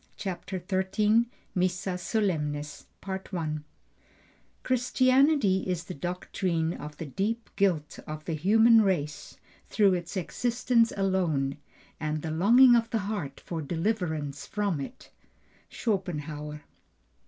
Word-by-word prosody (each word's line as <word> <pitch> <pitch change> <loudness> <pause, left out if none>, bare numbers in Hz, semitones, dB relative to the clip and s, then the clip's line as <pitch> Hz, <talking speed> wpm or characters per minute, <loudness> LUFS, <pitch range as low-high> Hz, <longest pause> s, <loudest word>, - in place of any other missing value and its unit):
CHAPTER 190 0 -4
XIII 210 +4 +2 0.3
MISSA 180 0 -1
SOLEMNIS 150 -8 -2 1.8
Christianity 255 -3 +3
is 180 -2 -1
the 180 - -7
doctrine 175 0 -2
of 150 +1 -8
the 165 - -5
deep 210 - -3
guilt 170 -7 0
of 155 0 -6
the 165 - -2
human 220 +8 +5
race 160 -7 -1 0.3
through 200 -3 +3
its 175 +2 -3
existence 235 +4 +1
alone, 170 -9 0 0.4
and 155 0 -2
the 160 - -3
longing 240 +10 +6
of 230 -1 +2
the 225 - 0
heart 150 -11 -4
for 165 -2 -5
deliverance 160 -4 -2
from 205 -7 -1
it. 245 - -9 0.6
SCHOPENHAUER. 150 -8 -3
185 Hz, 110 wpm, -28 LUFS, 155-215 Hz, 1.8 s, longing